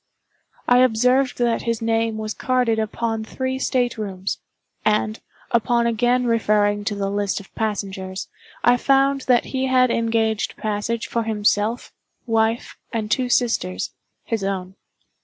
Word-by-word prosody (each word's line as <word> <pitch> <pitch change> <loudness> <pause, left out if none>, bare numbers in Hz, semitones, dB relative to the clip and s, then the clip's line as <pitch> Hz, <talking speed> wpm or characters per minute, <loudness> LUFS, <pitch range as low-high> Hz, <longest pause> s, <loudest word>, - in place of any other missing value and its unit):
I 245 0 +6
observed 255 +2 +3
that 240 -2 +1
his 230 -1 -1
name 225 -1 0
was 215 0 -3
carded 250 -3 +1
upon 225 +1 -2
three 260 +3 -3
state 245 -3 0
rooms; 195 -2 -3 0.4
and, 215 +1 +1 0.3
upon 235 +1 +2
again 240 +2 +2
referring 210 -3 +2
to 210 - -1
the 195 -1 -2
list 205 0 -1
of 200 - -15
passengers, 195 -3 -3 0.4
I 245 0 +5
found 275 +1 +3
that 245 -2 +4
he 265 0 0
had 255 -1 +4
engaged 225 -2 0
passage 215 +2 -2
for 235 - -1
himself, 215 +1 0 0.3
wife, 225 0 0
and 220 -3 -3
two 250 +1 +1
sisters—his 225 - -2
own. 190 -1 -3
225 Hz, 135 wpm, -22 LUFS, 210-245 Hz, 0.4 s, I